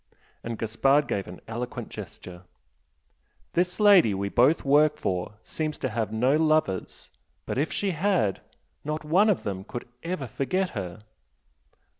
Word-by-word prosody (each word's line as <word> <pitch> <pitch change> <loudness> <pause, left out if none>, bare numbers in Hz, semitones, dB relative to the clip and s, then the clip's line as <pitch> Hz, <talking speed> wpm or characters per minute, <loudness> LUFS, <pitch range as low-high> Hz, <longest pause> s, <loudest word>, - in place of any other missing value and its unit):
And 115 -1 -4
Gaspard 135 +7 +2
gave 100 - -2
an 90 - -10
eloquent 120 +2 -5
gesture 90 -1 -9 1.1
"This 180 +3 0
lady 195 - +6
we 100 +1 -2
both 130 +10 +3
work 150 +2 +4
for 90 -3 -2
seems 155 -1 -3
to 130 - -2
have 110 -2 -2
no 125 +6 +2
lovers 155 -11 0 0.3
but - - -2
if 150 - 0
she 200 -2 -1
had, 170 - +1 0.4
not 155 +1 -4
one 190 +8 +4
of 205 - +1
them 95 -2 -4
could 120 +3 -7 0.2
ever 165 -4 -3
forget 180 - -1
her!" 95 -1 -6
135 Hz, 145 wpm, -26 LUFS, 105-160 Hz, 1.1 s, lady